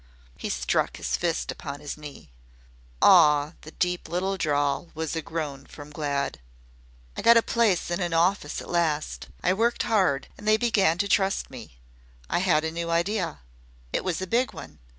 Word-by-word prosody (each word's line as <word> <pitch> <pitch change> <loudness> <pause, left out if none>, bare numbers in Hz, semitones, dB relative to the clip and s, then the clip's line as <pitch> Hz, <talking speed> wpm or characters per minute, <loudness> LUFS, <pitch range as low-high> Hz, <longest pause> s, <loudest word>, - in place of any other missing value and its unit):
He - - -5
struck - - 0
his - - -1
fist - - -1
upon 140 0 -7
his 145 0 -6
knee. 150 - -11 0.7
"Aw!" 150 -3 +6
The 155 - -11
deep 180 +2 -2
little 190 +3 -1
drawl 145 -1 0
was 160 0 -3
a 160 - -1
groan 150 -4 -5
from 145 0 -11
Glad. 145 -2 -2 0.8
"I - - -4
got 235 0 +7
a 230 - +4
place 215 -8 +1
in 175 +2 -1
an 175 -1 -1
office 165 -1 +1
at - - -10
last. 160 -3 -1 0.2
I 180 - +3
worked 230 +4 +1
hard, 185 -11 +1
and 210 - -9
they 215 0 +5
began 200 -7 +2
to 200 +2 0
trust 195 -4 +1
me. 115 - -11 0.5
I - - +2
had 175 -4 +2
a 160 - -2
new 170 0 -4
idea. 170 - -1 0.5
It - - 0
was 180 -3 -1
a - - -2
big 240 +7 0
one. - - -11
170 Hz, 180 wpm, -26 LUFS, 145-190 Hz, 0.8 s, got